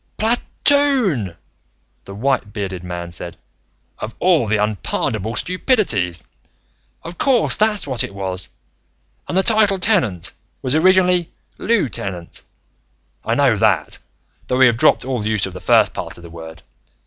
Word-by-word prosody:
"Pla 225 +2 +3 0.3
toon!" 240 - +3 0.7
the 100 - -9
white 130 -2 -1
bearded 95 -4 -5
man 85 -1 -6
said. 85 0 -9 0.6
"Of 110 +1 -6
all 170 -10 +2
the 110 +1 +1
unpardonable 105 +2 -2
stupidities! 120 - 0 0.8
Of 170 +1 -9
course 260 -5 +3
that's 215 -1 +1
what 130 -5 -1
it 100 - -7
was. 95 -1 -4 0.8
And - - -2
the 190 - +3
title, 215 -3 +5
Tenant, 170 - +1 0.3
was 130 - 0
originally 180 0 +3 0.3
lieu 225 -9 +1
tenant. 90 -6 -6 0.8
I - - -1
know - - +3
that, - - +1 0.5
though 125 - -1
we 130 - +6
have 120 -2 +3
dropped 120 - +3
all 125 -4 -3
use 110 -2 0
of 95 - -7
the 90 - -9
first - - +3
part - - -7
of 85 - -14
the 85 - -12
word. 80 -1 -11
120 Hz, 150 wpm, -19 LUFS, -, 0.8 s, we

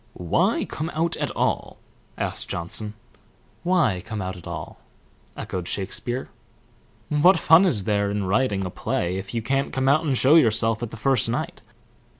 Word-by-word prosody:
"Why 85 -2 +1
come 155 +2 -4
out 165 +1 0
at - - -2
all?" - - -1 0.4
asked - - -2
Johnson. 105 +5 -3 0.7
"Why 170 - +2
come 110 - -5
out 95 0 -4
at 90 - -11
all?" - - -7 0.6
echoed 90 -2 -5
Shakespeare. 120 +6 -2 0.8
"What 165 +5 +5
fun 165 +4 +6
is 115 - +1
there 100 0 +1
in 100 0 -1
writing 100 0 +1
a 90 - -4
play 90 +1 -2
if 95 +4 -6
you 115 - -1
can't 135 +3 0
come 130 0 -1
out 140 +4 +4
and 140 -5 0
show 135 +5 +5
yourself 115 -4 +3
at 120 - -3
the 115 - -9
first 125 0 +1
night? 120 - -3
115 Hz, 165 wpm, -24 LUFS, 100-140 Hz, 0.8 s, fun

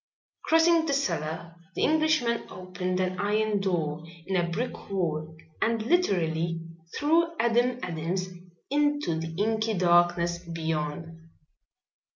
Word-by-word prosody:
Crossing 325 0 +4
the 285 - +1
cellar 165 - -2 0.2
the - - 0
Englishman 310 -7 +2
opened 185 0 -4
an 185 0 -1
iron 210 +1 +1
door 165 -5 -1 0.2
in 190 +1 -2
a 175 -1 +1
brick 235 +9 -4
wall 160 -4 -2 0.2
and 225 -1 +1
literally 170 - +1 0.4
threw 325 +3 +3
Adam 240 +1 +2
Adams 180 +2 -2 0.4
into 290 - +1
the 165 0 -5
inky 220 +1 +1
darkness 175 -1 +3
beyond. 165 -1 -4
185 Hz, 115 wpm, -27 LUFS, 165-235 Hz, 0.4 s, Crossing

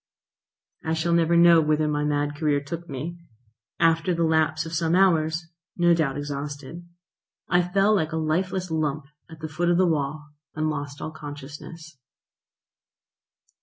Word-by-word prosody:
I 160 0 0
shall 170 +1 0
never 170 0 +3
know 170 -1 +7
whither 155 0 +1
my 150 -1 0
mad 145 0 0
career 150 -1 +1
took 165 +5 -7
me. 155 +6 -5 0.6
After 165 +1 +3
the 170 - 0
lapse 160 0 +1
of 165 - -7
some 165 +1 +1
hours, 160 -3 +3 0.3
no 175 -1 +4
doubt 150 -5 0
exhausted, 145 +3 -6 0.6
I 175 0 +3
fell 195 +4 +2
like 160 -6 +1
a 160 - -2
lifeless 180 +3 -1
lump 155 -2 -1 0.2
at 160 -1 -12
the 155 - -3
foot 170 +3 -1
of 175 - +3
the 185 - +4
wall, 150 -2 -1 0.3
and 155 0 0
lost 145 -1 -5
all 155 - -4
consciousness. 150 +1 -10
160 Hz, 155 wpm, -25 LUFS, 150-170 Hz, 0.6 s, know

